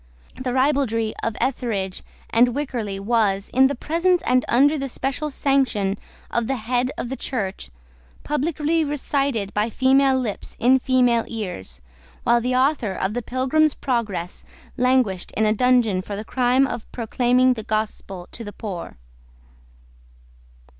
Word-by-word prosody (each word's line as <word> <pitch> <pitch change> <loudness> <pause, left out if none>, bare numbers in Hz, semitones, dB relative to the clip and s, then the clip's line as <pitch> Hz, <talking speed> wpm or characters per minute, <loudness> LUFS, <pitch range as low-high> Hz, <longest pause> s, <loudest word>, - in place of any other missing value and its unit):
The 255 -1 -3
ribaldry 255 -5 +1
of 225 -1 -2
Etherege 215 -8 -2 0.3
and 240 +1 +4
Wycherley 240 -9 -3
was, 200 -2 +1
in 265 +1 +6
the 280 - -2
presence 340 +7 +1
and 250 0 +2
under 280 +5 +4
the 275 -2 -3
special 275 +4 -2
sanction 260 -9 +1 0.4
of 235 -2 0
the 270 - 0
head 245 +2 -1
of 240 - -4
the 265 - -3
Church, 200 - -4 0.5
publicly 305 +2 0
recited 275 -7 -1
by 210 +2 0
female 265 +2 +3
lips 235 -6 -4
in 255 +3 +5
female 250 -3 +2
ears, 190 - -6 0.4
while 235 0 +3
the 250 +2 0
author 255 -6 +1
of 190 +2 -2
the 245 - -2
Pilgrim's 265 +5 +1
Progress 215 -9 -2 0.3
languished 250 -7 +1
in 220 - +1
a 215 - +3
dungeon 235 -5 +3
for 200 +2 -6
the 210 +2 -6
crime 255 +2 +2
of 240 -4 -6
proclaiming 250 +2 +2
the 225 - -6
gospel 210 -4 -3
to 235 - -8
the 205 - -7
poor. 185 - -7
245 Hz, 145 wpm, -22 LUFS, 215-265 Hz, 0.5 s, in